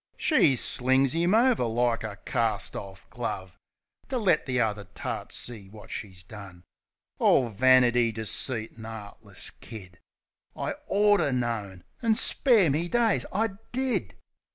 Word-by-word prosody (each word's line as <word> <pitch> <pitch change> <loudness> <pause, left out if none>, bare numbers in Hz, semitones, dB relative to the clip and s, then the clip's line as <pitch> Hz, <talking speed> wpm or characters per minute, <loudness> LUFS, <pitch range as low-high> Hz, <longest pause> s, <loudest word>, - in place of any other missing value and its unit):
She 160 - +4
slings 130 +2 +1
'im 170 +5 +2
over 240 - +3
like 115 0 0
a 105 -2 -5
carst 115 -5 0
orf 95 -1 -8
glove. 95 -8 -5 0.5
To 260 - -1
let 190 -11 +2
the 130 -1 0
other 105 -3 0
tarts - - -6
see 110 -5 -7
wot 105 +1 -13
she's 95 -4 -6
done. 100 -3 -11 0.6
All 125 -3 +4
vanity, 120 0 +4
deceit 110 +1 -3
an' 110 - -8
'eartless 110 -2 -7
kid! 95 -6 -10 0.6
I - - -2 0.2
orter 205 -6 +3
known; 110 -7 -3 0.2
an', 225 -2 +3
spare 220 - +4
me 160 +5 0
days, 230 +2 +1
I 220 +4 +1 0.2
did! 260 0 -1
120 Hz, 135 wpm, -27 LUFS, 105-170 Hz, 0.6 s, She